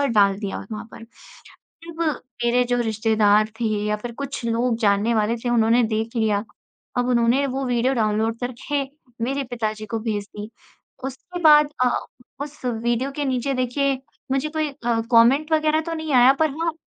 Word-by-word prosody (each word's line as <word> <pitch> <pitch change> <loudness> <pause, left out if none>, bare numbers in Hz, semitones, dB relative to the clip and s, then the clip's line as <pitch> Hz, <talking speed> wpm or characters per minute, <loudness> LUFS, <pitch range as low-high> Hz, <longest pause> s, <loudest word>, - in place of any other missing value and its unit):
और 280 - +2
डाल 200 -1 +4
दिया 200 -2 -4
वत - - -12
वहाँ 215 +1 -5
पर। 230 - -10 0.8
जब 335 0 -9 0.4
मेरे 245 +1 +3
जो 245 0 0
रिश्तेदार 215 -1 +2
थे - - 0 0.2
या 210 0 0
फिर 235 +2 -7
कुछ 280 -3 -5
लोग 230 +1 +1
जानने 210 +2 +2
वाले 220 +2 +1
थे - - 0
उन्होंने 235 +1 +4
देख 220 +2 -2
लिया, 215 -2 +1 0.5
अब 245 0 +1
उन्होंने 245 +3 +3
वो 270 +1 -3
विडिओ 245 +2 +1
डाउनलोड 220 0 0
करके 255 +4 -2 0.4
मेरे 275 +2 -1
पिता 225 -3 -1
जी 215 0 -9
को 225 0 -3
भेज 215 -2 -2
दी। 210 +1 -6 0.5
उसके 275 +7 -6
बाद 300 -1 +7
अ, 250 - +3 0.5
उस 290 0 -7
विडियो 240 +3 -1
के 290 - -1
नीचे 265 +1 -1
देखिए 260 +2 0 0.3
मुझे 270 +3 0
कोई 310 -1 -1
अ, 235 -4 -1
कॉमेन्ट 265 +7 +4
वगैरह 310 0 +3
तो 330 - -2
नहीं, 315 -2 -4
आया 250 +1 +7
पर 315 - +2
हाँ 335 -1 0
240 Hz, 180 wpm, -22 LUFS, 220-275 Hz, 0.8 s, बाद